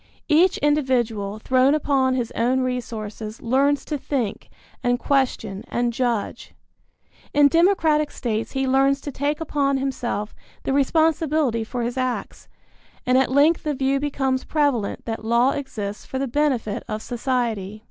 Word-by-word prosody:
Each 335 +4 +4
individual, 240 -8 0
thrown 260 +5 +3
upon 270 -3 +1
his 245 -3 -2
own 250 +3 +1
resources, 225 -3 -4
learns 275 +4 +1
to 300 -2 -3
think 250 -7 -3 0.3
and 245 0 +2
question 245 -7 -1
and 240 0 -1
judge. 235 -3 -2 0.8
In 290 0 +7
democratic 320 -2 +3
states 225 -2 -3
he 270 -1 0
learns 270 +1 +3
to 285 - -5
take 285 +3 -1
upon 285 -3 0
himself 250 -6 -3 0.3
the 270 - -1
responsibility 305 -3 +2
for 240 +2 -4
his 240 +2 -3
acts, 255 -1 -3 0.6
and 250 - +2
at 265 0 +3
length 290 +5 +4
the 300 -2 -2
view 270 +1 +1
becomes 270 -2 -1
prevalent 285 -9 0
that 225 -1 -4
law 235 +4 +3
exists 215 -8 -5
for 265 - -5
the 270 +1 -1
benefit 255 -6 0
of 215 0 -4
society. 230 -5 -2
260 Hz, 145 wpm, -23 LUFS, 235-285 Hz, 0.8 s, In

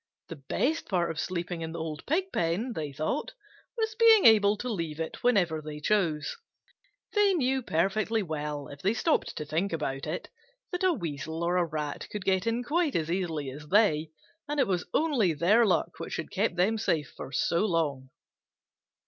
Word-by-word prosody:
The 165 - -6
best 315 +5 0
part 175 -4 +1
of 160 - -6
sleeping 175 +1 -3
in 160 0 -4
the 170 - -5
old 155 -2 -5
Pigpen, 250 - 0
they 150 -7 -4
thought, 155 - -3 0.4
was 440 -1 0
being 445 -2 +6
able 210 -2 +6
to 250 - -5
leave 165 -9 -3
it 160 - -4
whenever 180 -10 +2
they 150 0 -7
chose. 155 -4 0 0.8
They 410 -2 +4
knew 265 -4 +1
perfectly 215 +3 0
well, 150 -3 -4
if 140 0 -10
they 200 +4 +1
stopped 320 +5 +1
to 150 - -3
think 165 +7 -1
about 135 -3 -3
it, 160 +4 -4 0.4
that 360 0 -3
a 370 - +5
Weasel 160 - -4
or 175 0 +2
Rat 150 -2 -4
could 205 -3 -5
get 190 +3 +1
in 230 +2 0
quite 310 +2 0
as 165 0 0
easily 165 -7 -2
as 150 +3 -10
they, 160 -5 +3 0.4
and 295 0 -2
it - - +5
was 180 -2 -1
only 255 - +2
their 205 +9 +4
luck 185 - 0
which - - -4
had 160 - -5
kept 200 -2 0
them 205 +5 +2
safe 155 -8 -1 0.2
so 170 +5 +1
long. 160 -9 0
175 Hz, 180 wpm, -28 LUFS, 155-230 Hz, 0.8 s, being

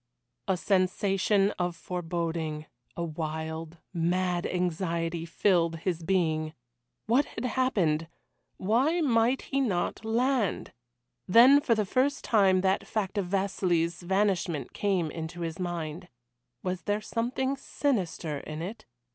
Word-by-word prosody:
A 190 -2 +2
sensation 195 +2 +2
of 175 -1 -1
foreboding 165 -3 -3 0.3
a 170 - -1
wild, 160 0 -4 0.2
mad 175 +1 0
anxiety, 170 -2 -1
filled 170 -2 +2
his 170 +1 -2
being. 160 -3 0 0.5
What 250 +6 +3
had - - -6
happened? 195 -12 +1 0.5
Why 260 - +2
might 245 -2 +2
he 275 - -1
not 200 -4 -1
land? 235 -1 0 0.5
Then 250 +8 +7
for 235 -5 +2
the 215 -1 0
first 270 +7 +1
time 195 -4 +4
that 190 +1 +1
fact 205 -2 -1
of 190 - -2
Vasili's 180 -3 0
vanishment 185 -4 0
came 185 -6 0
into 165 +1 -6
his 165 +1 -4
mind. 175 -1 -4 0.6
Was 185 -1 -2
there 205 0 +1
something 255 +5 -1
sinister 190 - -2
in 155 +2 -6
it? 200 - -7
185 Hz, 120 wpm, -28 LUFS, 165-215 Hz, 0.6 s, Then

